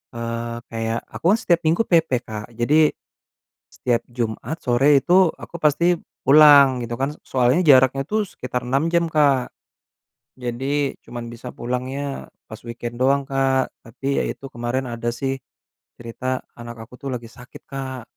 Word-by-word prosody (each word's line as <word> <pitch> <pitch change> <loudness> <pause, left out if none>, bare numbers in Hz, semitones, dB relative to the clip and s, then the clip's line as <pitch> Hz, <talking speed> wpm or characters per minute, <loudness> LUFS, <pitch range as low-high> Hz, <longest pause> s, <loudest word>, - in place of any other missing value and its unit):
eee, 115 0 -4
kayak, 115 0 -2
aku - - -9
kan - - -2
setiap 170 -5 +2
minggu 170 +8 +3
PP 165 -4 +3 0.2
Kak. 110 +1 -7
Jadi, 150 +6 +3 0.8
setiap 120 -2 -1
jumat 120 +6 -4
sore 135 +3 +4
itu 180 -1 +4
aku 170 - -9
pasti 170 +3 +2 0.2
pulang 140 -2 +7
gitu 120 0 -4
kan, 135 +3 -1
s - - -19
soalnya 130 +5 +2
jaraknya 130 -1 +5
tuh 215 0 0
sekitar 125 -6 -5
6 135 +5 +1
jam 170 0 +3
Kak. 140 -5 +3 0.9
Jadi 135 +3 -2
cuman 120 -1 -7
bisa 120 +2 -9
pulangnya 130 +3 -4 0.2
pas 110 0 -10
weekend 120 +1 -6
doang 140 +1 +3
Kak, 135 -1 +1
tapi 135 +5 -2
ya - - 0
itu, - - -7
kemarin 120 +3 -2
ada 115 0 -3
sih 135 +1 -3 0.6
cerita 125 +2 -4 0.2
anak 120 0 -8
aku - - -21
tuh 140 - -4
lagi 115 -1 -8
sakit 125 0 -14
Kak. 130 -3 -6
130 Hz, 155 wpm, -22 LUFS, 120-145 Hz, 0.9 s, pulang